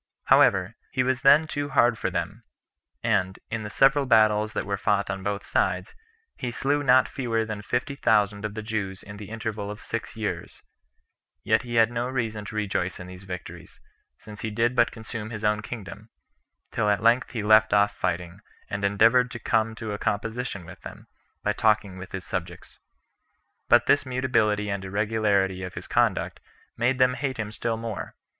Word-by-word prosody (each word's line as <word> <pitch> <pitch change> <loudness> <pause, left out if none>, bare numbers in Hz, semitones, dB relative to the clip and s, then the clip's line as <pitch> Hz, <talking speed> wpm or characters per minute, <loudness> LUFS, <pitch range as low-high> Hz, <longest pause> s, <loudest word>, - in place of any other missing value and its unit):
However, 95 +2 +4 0.2
he 130 - 0
was 130 0 0
then 140 +4 +6
too 145 -2 -3
hard 120 -4 +4
for 110 - -2
them; 90 +6 -4 0.6
and, 95 -4 +1
in 115 0 -2
the 105 - -6
several 135 +4 +3
battles 110 -2 +4
that - - -2
were 100 - -1
fought 100 0 0
on 95 0 -4
both 100 +1 -3
sides, - - 0 0.4
he 125 - -3
slew 140 +4 0
not 130 -2 +5
fewer 115 -4 -1
than 110 -1 -5
fifty 125 +6 -2
thousand 105 -5 +2
of 105 -1 -4
the 110 - -5
Jews 105 -4 -4
in 100 0 -10
the 105 -1 -9
interval 110 -2 -4
of 105 0 -7
six 115 +1 -5
years. 110 -2 -5 0.8
Yet 110 - +3
had 115 -2 +3
he - - -11
no 120 +1 -1
reason 110 -5 -3
to 110 - -8
rejoice 95 -3 -2
in 95 - -7
these 90 +1 -11
victories, 90 -1 -9 0.4
since 105 -1 -11
he 110 - -2
did 115 +3 0
but 120 -1 +4
consume 110 -1 -7
his 110 -2 -7
own 105 0 +2
kingdom; 105 -1 -8 0.6
till 105 - 0
at 105 +1 +1
length 120 +3 +4
he 115 -5 -4
left 110 +1 +5
off 100 0 +3
fighting, 90 0 -3 0.3
and 100 0 -3
endeavored 115 +5 +4
to 120 - -6
come 110 -1 0
to 110 -1 -5
a 105 - -5
composition 110 -2 -3
with - - -12
them, - - -10 0.4
by 105 - +1
talking 105 -3 +1
with 95 - -9
his 95 -1 -6
subjects. 90 -1 -6 0.9
But - - +6
this 145 - +4
mutability 120 -5 +1
and 100 -1 -3
irregularity 100 -2 0
of 90 -1 -6
his - - -6
conduct - - 0 0.4
made 125 +3 +1
them 130 0 +4
hate 135 -1 -3
him 110 -2 -4
still 115 +1 -2
more. 115 -2 -6
110 Hz, 185 wpm, -26 LUFS, 100-120 Hz, 0.9 s, then